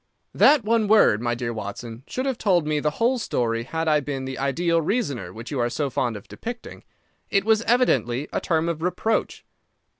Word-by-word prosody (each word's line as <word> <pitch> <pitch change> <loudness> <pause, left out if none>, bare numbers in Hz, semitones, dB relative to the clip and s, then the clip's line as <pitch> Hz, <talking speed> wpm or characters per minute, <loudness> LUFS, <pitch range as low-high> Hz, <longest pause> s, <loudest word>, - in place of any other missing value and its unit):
"That 290 -5 +5
one 220 0 +2
word, 205 - +5
my 120 0 0
dear 120 -1 -3
Watson, 115 +2 -7
should 255 - -3
have 265 -3 -2
told 180 -6 +2
me 150 -1 0
the 150 - +1
whole 245 +2 +2
story 115 - -1
had 160 +4 -3
I 155 -1 +4
been 135 -2 -4
the 130 0 -5
ideal 165 +5 +1
reasoner 145 - -2
which 115 +7 -9
you 140 - -2
are 120 0 +1
so 140 +2 -2
fond 120 -4 -1
of 100 - -13
depicting. 240 0 -8 0.5
It 200 -1 +1
was 220 0 +3
evidently 140 - +2
a - - -1
term 165 -1 0
of 165 -2 -3
reproach." 200 +5 -1
150 Hz, 200 wpm, -24 LUFS, -, 0.5 s, That